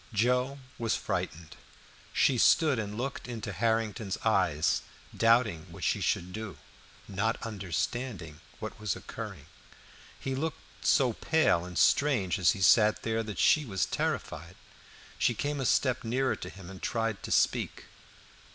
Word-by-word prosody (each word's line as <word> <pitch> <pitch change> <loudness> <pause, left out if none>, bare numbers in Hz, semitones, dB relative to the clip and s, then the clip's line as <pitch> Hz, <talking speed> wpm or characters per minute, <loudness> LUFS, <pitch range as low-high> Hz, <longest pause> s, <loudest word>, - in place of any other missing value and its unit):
Joe 125 +5 +1 0.2
was 115 -2 +1
frightened; 80 0 -4 0.6
she 130 -4 +3
stood 150 -3 +4
and 105 -1 -4
looked 135 +2 -4
into 115 -4 -5
Harrington's 110 0 0
eyes, 90 -8 +2 0.3
doubting 115 -8 +3
what - - -10
she - - +1
should 90 +1 -1
do, 110 -2 -6 0.5
not 110 +4 -1
understanding 100 - -4 0.2
what - - -7
was 105 -1 -1
occurring. - - -8 0.7
He 135 - -3
looked 155 +4 -3 0.3
so 130 -5 +4
pale 155 - +2
and 90 -1 -7
strange 110 - +3
as 90 - +4
he 95 - -3
sat 105 +3 +5
there, 115 0 0
that 105 -2 -6
she 155 - +4
was 95 -8 -1
terrified. 85 +4 -3 0.6
She 120 - +2
came 145 +4 -2
a 130 - +1
step 130 -2 +2
nearer 130 +3 0
to - - -7
him, 95 -1 -11
and 95 - -11
tried 115 -3 -1
to - - -7
speak. - - +1
110 Hz, 145 wpm, -30 LUFS, 95-125 Hz, 0.7 s, sat